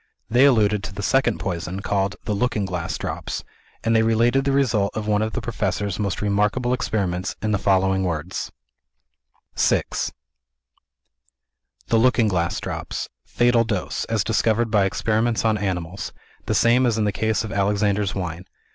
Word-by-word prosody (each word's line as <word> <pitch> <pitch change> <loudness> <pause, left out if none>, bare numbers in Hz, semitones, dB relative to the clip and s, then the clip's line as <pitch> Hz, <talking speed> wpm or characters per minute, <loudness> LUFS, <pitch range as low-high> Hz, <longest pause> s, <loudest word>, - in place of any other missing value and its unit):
They 125 +4 +6
alluded 105 -6 +3
to - - -7
the 100 - -5
second 125 -1 +2
poison, 90 +1 -4
called 100 -2 0
"The 105 - -1
Looking 110 -1 0
Glass 85 -4 -3
Drops;" - - -4 0.4
and 115 0 +2
they 110 - +5
related 115 +4 +2
the 140 - +2
result 120 -8 +1
of 110 - -3
one 105 0 +2
of 110 0 -2
the - - -2
Professor's 100 -2 -2
most 100 -1 -2
remarkable 105 +5 +1
experiments 95 -6 -1
in 110 - -1
the 100 - +1
following 95 -1 +2
words: 85 0 -3 1.0
VI - - +3 2.1
"The 115 - +4
Looking 120 -1 +4
Glass 85 -3 0
Drops. - - -5 0.2
Fatal 120 -1 +3
Dose, 105 -5 -2
as - - 0
discovered 115 0 +1
by 105 -3 +4
experiments 115 +4 0
on 110 -1 +3
animals, 90 -2 -3 0.3
the - - +1
same 125 +2 +4
as 115 -2 +1
in 110 - +1
the 105 - +1
case 110 +2 0
of 110 - -5
Alexander's 100 0 +1
Wine. 90 -2 -4
105 Hz, 160 wpm, -23 LUFS, 95-115 Hz, 2.1 s, They